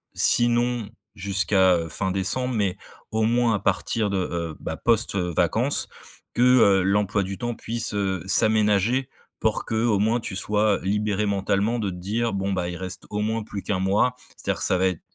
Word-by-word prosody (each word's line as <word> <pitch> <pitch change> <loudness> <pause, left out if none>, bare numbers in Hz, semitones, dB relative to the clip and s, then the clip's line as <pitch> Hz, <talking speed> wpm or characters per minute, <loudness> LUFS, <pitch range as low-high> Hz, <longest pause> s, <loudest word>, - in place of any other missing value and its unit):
sinon 120 -1 +3 0.3
jusqu'à, 95 -2 +2
heu, 85 -1 -4
fin 95 +3 -2
décembre, 115 +7 0
mais 100 -4 -1 0.3
au 110 0 0
moins 120 +1 +2
à - - -2
partir 100 +3 -1
de, 100 - -1
heu, 85 -3 -3
bah, - - -5
post, 115 -3 +2
heu, 90 -2 -1
vacances - - +3 0.5
que, - - 0
heu, 110 -7 +5
l'emploi 100 +1 +1
du 95 +1 -6
temps 120 -1 -4
puisse, 115 -1 -2
heu, 95 -3 -2
s'aménager 110 +5 +2 0.3
pour, 110 -1 0
qu'au 110 -1 0
moins, 110 +4 +1
tu 110 -4 -6
sois 105 +1 +1
libéré 105 +1 -1
mentalement 100 +3 0
de 105 -3 -2
te 90 - -7
dire: 110 +6 -2
«Bon 100 0 -2
bah, 90 -2 -2
il 90 - -6
reste 95 +1 -5
au 105 - -3
moins 110 +1 -2
plus 105 -2 -7
qu'un 95 -3 -2
mois», 100 +7 +1 0.2
c'est-à-dire - - -3
ça 95 - +3
va 95 +1 +2
être 90 -3 -3
105 Hz, 185 wpm, -23 LUFS, 95-115 Hz, 0.5 s, heu